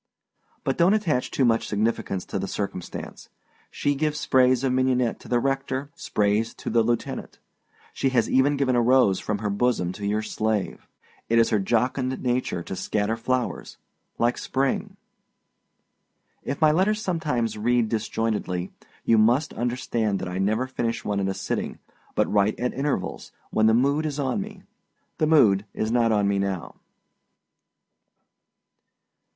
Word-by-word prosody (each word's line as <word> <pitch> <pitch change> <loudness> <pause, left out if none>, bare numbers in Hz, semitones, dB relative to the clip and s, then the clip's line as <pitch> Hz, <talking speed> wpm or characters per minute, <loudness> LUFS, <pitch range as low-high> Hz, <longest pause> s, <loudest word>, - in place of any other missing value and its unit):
But 135 +3 -1
donât 180 +5 +5
attach 140 -9 0
too 135 - +1
much 115 -1 +2
significance 105 -3 -1
to - - -3
the 95 - -3
circumstance. 95 -3 -6 0.4
She 145 - 0
gives 150 +1 -1
sprays 130 -3 +3
of 130 -2 +1
mignonette 130 -2 +1
to - - -14
the 120 - +2
rector, 135 +1 -2
sprays 105 -6 0
to - - -5
the 115 0 +4
lieutenant. 120 +1 -2 0.6
She 135 - 0
has 120 -4 +2
even 140 +2 +3
given 130 -2 +1
a 120 - +4
rose 120 -6 +4
from 105 - -2
her 105 0 -2
bosom 100 -4 +1
to 100 +2 -5
your 105 +1 0
slave. 110 -2 -2 0.4
It 115 - +3
is 115 - +4
her 110 - +3
jocund 125 +5 0
nature 125 -8 -1
to 95 - -6
scatter 105 +3 -1
flowers, 125 +2 -2 0.4
like 120 +1 +1
Spring. 135 0 -1 1.4
If 140 - -4
my 155 -1 +6
letters 195 +6 +2
sometimes 155 - -1
read 120 +2 +1
disjointedly, 110 -5 -2 0.3
you 115 - +4
must 120 +8 +3
understand 120 -4 -1
that - - -5
I 90 +1 -4
never 110 +6 +1
finish 120 -3 -3
one 100 -1 0
at 95 - 0
a 95 - -2
sitting, - - -3 0.4
but - - +3
write 105 +1 +1
at 125 0 -1
intervals, 135 -9 -3 0.2
when 110 0 +3
the 110 - +5
mood 140 +5 +2
is 145 -2 -4
on 130 -3 0
me. - - -9 0.6
The 155 - +3
mood 105 -10 +4
is 110 +1 -1
not 120 -1 +3
on 105 -2 +2
me 100 0 +1
now. 100 -3 -3
120 Hz, 155 wpm, -25 LUFS, 105-130 Hz, 1.4 s, my